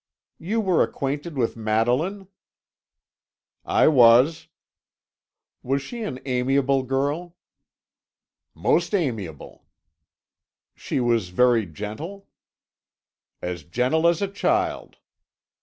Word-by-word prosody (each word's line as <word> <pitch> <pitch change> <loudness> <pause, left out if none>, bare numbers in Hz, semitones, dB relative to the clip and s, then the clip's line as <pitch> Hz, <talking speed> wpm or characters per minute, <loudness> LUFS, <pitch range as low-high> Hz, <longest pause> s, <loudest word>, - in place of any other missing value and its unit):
"You 215 +7 -1
were 185 -5 +2
acquainted 145 +3 -3
with 115 -3 0
Madeline?" 120 - 0 1.4
"I - - +3
was." 130 +3 +5 1.1
"Was 135 +2 -1
she 235 - -7
an 130 - -4
amiable 135 +1 +1
girl?" 145 +7 -2 1.2
"Most 165 - +1
amiable." 110 - -4 1.1
"She - - -3
was 115 -6 +1
very 115 +2 +3
gentle?" 110 - -7 1.2
"As 90 -1 -4
gentle 125 - +1
as 170 +3 +2
a - - 0
child." 335 - -1
135 Hz, 90 wpm, -24 LUFS, 115-170 Hz, 1.4 s, was